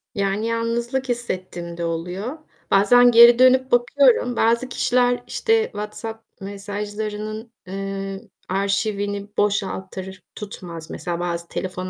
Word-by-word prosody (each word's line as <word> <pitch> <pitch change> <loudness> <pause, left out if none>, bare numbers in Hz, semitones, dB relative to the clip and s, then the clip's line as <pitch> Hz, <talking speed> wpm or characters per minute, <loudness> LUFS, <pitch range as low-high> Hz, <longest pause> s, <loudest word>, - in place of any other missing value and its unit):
Yani 200 +2 -1
yalnızlık 235 +3 -2
hissettiğim 185 -7 -4
de 170 - -3
oluyor. 180 - -4 0.3
Bazen 245 +5 +6
geri 235 +1 +8
dönüp 260 +1 +5
bakıyorum. 245 0 +3
Bazı 235 +3 +2
kişiler 245 0 +1
işte 450 -1 +2
WhatsApp 220 - -7 0.2
mesajlarının, 210 +2 -5 0.2
eee, 195 0 -5 0.3
arşivini 200 +1 -1
boşaltır 190 -2 -2
tutmaz, 175 -6 -8
mesela 170 -1 -4
bazı 170 -1 -3
telefon 185 0 -5
210 Hz, 105 wpm, -22 LUFS, 195-240 Hz, 0.3 s, geri